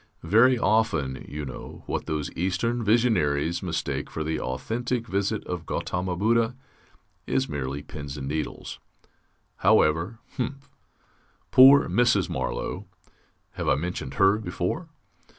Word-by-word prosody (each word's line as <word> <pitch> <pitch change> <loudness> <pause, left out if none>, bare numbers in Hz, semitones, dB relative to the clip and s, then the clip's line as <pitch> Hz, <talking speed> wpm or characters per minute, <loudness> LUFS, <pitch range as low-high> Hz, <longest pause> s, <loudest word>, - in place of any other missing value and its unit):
Very 115 +9 +5
often, 85 - +1
you 75 0 -5
know, 65 - -9
what - - -3
those 75 -1 -2
Eastern 100 +7 -1
visionaries 85 -9 +2
mistake 85 -4 -3
for 80 - -4
the 80 +1 -2
authentic 115 - -2
visit 100 +2 -1
of 85 -3 -5
Ghautama 90 0 -2
Buddha 115 +4 +2 0.7
is 135 0 +1
merely 70 - -4
pins 70 -1 -7
and 70 -1 -5
needles. 75 +1 -4 0.8
However. 80 +9 +3 0.2
Humph. 135 +2 -4 0.8
Poor 135 +2 +8
Mrs. 120 -6 +2
Marlow - - -3 0.6
(have - - -3
I - - +4
mentioned 90 +4 -4
her 100 +2 +4
before?) 110 - -3
95 Hz, 120 wpm, -26 LUFS, 75-115 Hz, 0.8 s, Poor